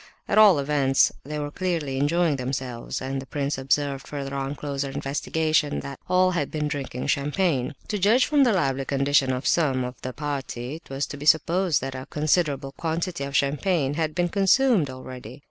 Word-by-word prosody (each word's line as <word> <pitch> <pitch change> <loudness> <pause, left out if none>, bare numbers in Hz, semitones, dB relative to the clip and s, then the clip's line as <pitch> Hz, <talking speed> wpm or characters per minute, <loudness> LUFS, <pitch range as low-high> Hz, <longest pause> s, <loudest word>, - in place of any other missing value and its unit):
At - - +3
all 205 -6 +8
events 140 -1 +3
they 150 +1 -5
were 145 -1 -4
clearly 160 -7 -2
enjoying 160 +1 +2
themselves, 125 -2 -4
and 135 +1 -3
the 135 - -11
prince 140 0 -2
observed 140 +1 0
further 140 -1 -5
on 135 +1 -3
closer 140 -1 -3
investigation—that 145 0 -1
all 185 0 +4
had 160 -6 -1
been 150 -1 -2
drinking 140 -4 -4
champagne. 145 -2 0
To 210 - -1
judge 220 +7 +4
from 295 -2 +3
the 245 - +4
lively 135 -8 0
condition 140 -1 +2
of 130 +1 -3
some 135 -6 +2
of 125 -1 -7
the 130 - -4
party, 135 -1 -4
it 165 - -19
was 135 +1 -2
to 145 - -8
be 145 +1 -6
supposed 170 0 +3
that 135 0 -4
a 130 0 -7
considerable 150 -3 0
quantity 165 +1 -3
of 140 0 -6
champagne 145 +1 +1
had 155 0 -2
been 175 0 +1
consumed 200 - +3
already. 130 -1 -9
145 Hz, 180 wpm, -25 LUFS, 135-165 Hz, -, all